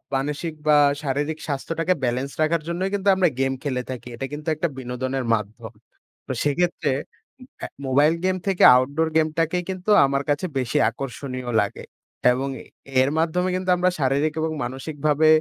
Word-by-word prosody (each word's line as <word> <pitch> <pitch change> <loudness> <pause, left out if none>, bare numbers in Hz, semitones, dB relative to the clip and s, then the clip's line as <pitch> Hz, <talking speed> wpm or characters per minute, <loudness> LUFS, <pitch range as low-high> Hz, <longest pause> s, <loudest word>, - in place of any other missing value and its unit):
মানসিক 150 +4 -2
বা 150 - +6 0.3
শারীরিক 145 +3 -2
স্বাস্থ্যটাকে 165 +5 -1
ব্যালেন্স 130 +3 -1
রাখার 155 +1 +2
জন্যই 180 +3 -1
কিন্তু 200 0 -2
আমরা 185 -2 +3
গেম 135 0 +1
খেলে 130 -3 -1
থাকি। 125 -1 -6
এটা 135 - -4
কিন্তু 150 +2 -7
একটা 170 +3 0
বিনোদনের 130 +1 -3
মাধ্যম। 110 +2 -3 0.6
তো - - -3
সেক্ষেত্রে 160 0 0 0.7
আ - - -1 0.2
মোবাইল 145 +4 +4
গেম 185 0 +1
থেকে 190 -2 +2
আউটডোর 140 +6 +1
গেমটাকেই 165 +3 +1
কিন্তু 185 +2 -4 0.2
আমার 140 +1 0
কাছে 145 +5 +1
বেশি 130 +3 0
আকর্ষণীয় 130 0 -6
লাগে। 100 - -4 0.5
এবং 135 +2 -2 0.5
এর 135 - +2
মাধ্যমে 180 +3 +1
কিন্তু 185 0 -3
আমরা 180 +1 +3
শারীরিক 140 +3 +1
এবং 160 0 -1
মানসিকভাবে 150 +3 0
145 Hz, 150 wpm, -23 LUFS, 130-165 Hz, 0.7 s, বা